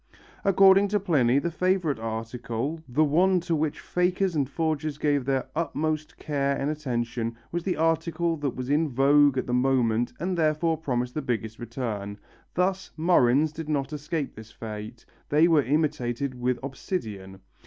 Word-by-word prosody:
According 195 Hz, +1 st, +6 dB
to 205 Hz, +1 st, +1 dB
Pliny 140 Hz, -10 st, +2 dB
the 170 Hz, +4 st, 0 dB
favourite 180 Hz, -5 st, 0 dB
article, 115 Hz, +6 st, -4 dB
the 145 Hz, +6 st, +3 dB
one 180 Hz, +5 st, +3 dB
to 170 Hz, -1 st, -1 dB
which 155 Hz, -1 st, -1 dB
fakers 180 Hz, 0 st, 0 dB
and 140 Hz, -3 st, 0 dB
forgers 155 Hz, -1 st, -2 dB
gave 145 Hz, -3 st, +1 dB
their 135 Hz, -1 st, 0 dB
utmost 155 Hz, -1 st, -2 dB
care 140 Hz, -2 st, -1 dB
and 140 Hz, +2 st, -1 dB
attention, 120 Hz, -5 st, -3 dB
was 175 Hz, -, -1 dB
the 180 Hz, -5 st, 0 dB
article 165 Hz, +1 st, +1 dB
that 145 Hz, -4 st, -3 dB
was 130 Hz, -1 st, -5 dB
in 155 Hz, +1 st, +2 dB
vogue 140 Hz, +1 st, +4 dB
at -, -, 0 dB
the 125 Hz, -, -3 dB
moment 125 Hz, -2 st, +2 dB
and 180 Hz, +2 st, -1 dB
therefore 160 Hz, 0 st, +1 dB
promised 125 Hz, -5 st, -2 dB
the 155 Hz, -, -2 dB
biggest 110 Hz, -4 st, -3 dB
return. 115 Hz, -4 st, -4 dB, 0.4 s
Thus 190 Hz, +1 st, 0 dB
murrhines 155 Hz, -3 st, +3 dB
did 155 Hz, -1 st, -6 dB
not 140 Hz, -1 st, -1 dB
escape 150 Hz, 0 st, -3 dB
this 110 Hz, 0 st, -12 dB
fate, 110 Hz, +1 st, -8 dB, 0.2 s
they 155 Hz, +3 st, +5 dB
were 160 Hz, -3 st, +5 dB
imitated 140 Hz, -3 st, -1 dB
with 125 Hz, 0 st, -1 dB
obsidian. 105 Hz, -, -5 dB
145 Hz, 160 wpm, -26 LUFS, 125-165 Hz, 0.4 s, According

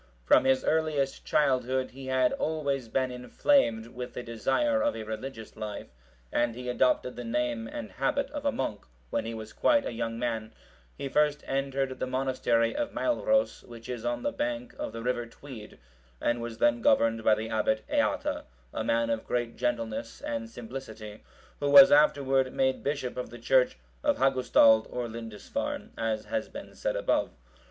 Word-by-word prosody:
From -, -, +5 dB
his 130 Hz, 0 st, +3 dB
earliest 155 Hz, -4 st, 0 dB
childhood(742) 130 Hz, -3 st, +1 dB
he 135 Hz, +1 st, -9 dB
had 130 Hz, -1 st, +2 dB
always 140 Hz, -5 st, -1 dB
been 130 Hz, +2 st, 0 dB
inflamed 125 Hz, -, +2 dB
with 125 Hz, +1 st, -7 dB
the 125 Hz, -, -4 dB
desire 275 Hz, -, +1 dB
of 290 Hz, 0 st, +1 dB
a -, -, -5 dB
religious 110 Hz, +1 st, -7 dB
life; 105 Hz, -1 st, -6 dB, 0.4 s
and 120 Hz, -1 st, +1 dB
he 125 Hz, 0 st, -5 dB
adopted 125 Hz, 0 st, +1 dB
the 120 Hz, -, -6 dB
name 120 Hz, -1 st, -1 dB
and 110 Hz, -1 st, -7 dB
habit 270 Hz, -, -1 dB
of 290 Hz, -1 st, -5 dB
a 285 Hz, -, +2 dB
monk 105 Hz, -, -3 dB, 0.3 s
when -, -, -1 dB
he 115 Hz, 0 st, -4 dB
was 110 Hz, -1 st, -8 dB
quite 290 Hz, -2 st, +3 dB
a -, -, -2 dB
young 115 Hz, 0 st, -3 dB
man: 115 Hz, -2 st, -3 dB, 0.4 s
he 140 Hz, -, -4 dB
first 150 Hz, +1 st, +2 dB
entered 135 Hz, -1 st, -1 dB
the -, -, -1 dB
monastery 130 Hz, -3 st, +1 dB
of 295 Hz, -, -2 dB
Mailros,(743) 275 Hz, -3 st, +1 dB
which 115 Hz, 0 st, -10 dB
is 120 Hz, -2 st, -4 dB
on 120 Hz, -, -2 dB
the 290 Hz, -, 0 dB
bank 290 Hz, -3 st, -3 dB
of -, -, -3 dB
the 115 Hz, +1 st, -7 dB
river 120 Hz, -1 st, -1 dB
Tweed, 115 Hz, -3 st, -11 dB, 0.4 s
and 120 Hz, 0 st, 0 dB
was 115 Hz, -1 st, -5 dB
then 120 Hz, 0 st, +3 dB
governed 115 Hz, 0 st, +3 dB
by 110 Hz, -, +5 dB
the 110 Hz, +1 st, -5 dB
Abbot 110 Hz, 0 st, +1 dB
Eata,(744) -, -, 0 dB, 0.3 s
a -, -, -2 dB
man 115 Hz, 0 st, +1 dB
of 115 Hz, -1 st, -1 dB
great 120 Hz, -1 st, -1 dB
gentleness 115 Hz, -2 st, -2 dB
and 115 Hz, -1 st, -4 dB
simplicity, 110 Hz, -3 st, -8 dB, 0.4 s
who 145 Hz, -, 0 dB
was 180 Hz, +6 st, +10 dB
afterward 135 Hz, -3 st, +4 dB
made 130 Hz, 0 st, +1 dB
bishop 140 Hz, -4 st, -2 dB
of 125 Hz, -, -4 dB
the 120 Hz, -, -10 dB
church 125 Hz, -, +3 dB, 0.3 s
of -, -, +2 dB
Hagustald 125 Hz, -4 st, +5 dB
or 125 Hz, -1 st, -3 dB
Lindisfarne,(745) 115 Hz, -2 st, -5 dB
as 110 Hz, -1 st, -1 dB
has 280 Hz, -, -2 dB
been -, -, -9 dB
said -, -, -2 dB
above. -, -, +1 dB
125 Hz, 175 wpm, -29 LUFS, 115-135 Hz, 0.4 s, was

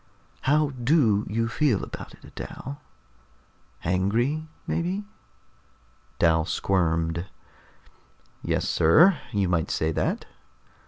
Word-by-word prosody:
"How 150 Hz, 0 st, +3 dB
do 120 Hz, -5 st, +2 dB
you 115 Hz, +2 st, 0 dB
feel 120 Hz, -2 st, +1 dB
about -, -, -8 dB
it, -, -, -16 dB
Dal? 140 Hz, +2 st, -7 dB, 1.0 s
Angry, 115 Hz, -, 0 dB, 0.2 s
maybe?" 185 Hz, +5 st, -2 dB, 1.1 s
Dal 80 Hz, -1 st, +3 dB
squirmed. 85 Hz, 0 st, 0 dB, 1.1 s
"Yes, -, -, -1 dB
sir. 155 Hz, -, +5 dB
You 100 Hz, -4 st, +1 dB
might 85 Hz, -3 st, 0 dB
say 80 Hz, 0 st, 0 dB
that." -, -, -1 dB
105 Hz, 95 wpm, -26 LUFS, -, 1.1 s, sir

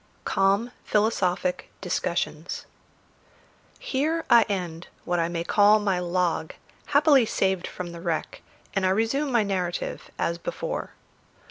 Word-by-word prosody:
CALM 200 Hz, +5 st, +2 dB
PHILOSOPHIC 185 Hz, -4 st, 0 dB
DISCUSSIONS -, -, -2 dB, 1.1 s
Here 315 Hz, +5 st, -1 dB
I 235 Hz, -, +9 dB
end 175 Hz, -4 st, -3 dB, 0.2 s
what 175 Hz, 0 st, 0 dB
I 165 Hz, -, +1 dB
may 170 Hz, -1 st, -3 dB
call 205 Hz, +4 st, +5 dB
my 195 Hz, -3 st, 0 dB
log, 175 Hz, -2 st, -1 dB, 0.3 s
happily 285 Hz, -4 st, +5 dB
saved 190 Hz, -3 st, 0 dB
from 180 Hz, -1 st, -6 dB
the 170 Hz, 0 st, -9 dB
wreck, 170 Hz, -3 st, -3 dB, 0.3 s
and 195 Hz, -, 0 dB
I 185 Hz, -, +3 dB
resume 225 Hz, +9 st, +1 dB
my 235 Hz, -3 st, +3 dB
narrative 185 Hz, -3 st, -3 dB
as 170 Hz, 0 st, -1 dB
before. -, -, -4 dB
195 Hz, 125 wpm, -26 LUFS, 175-230 Hz, 1.1 s, I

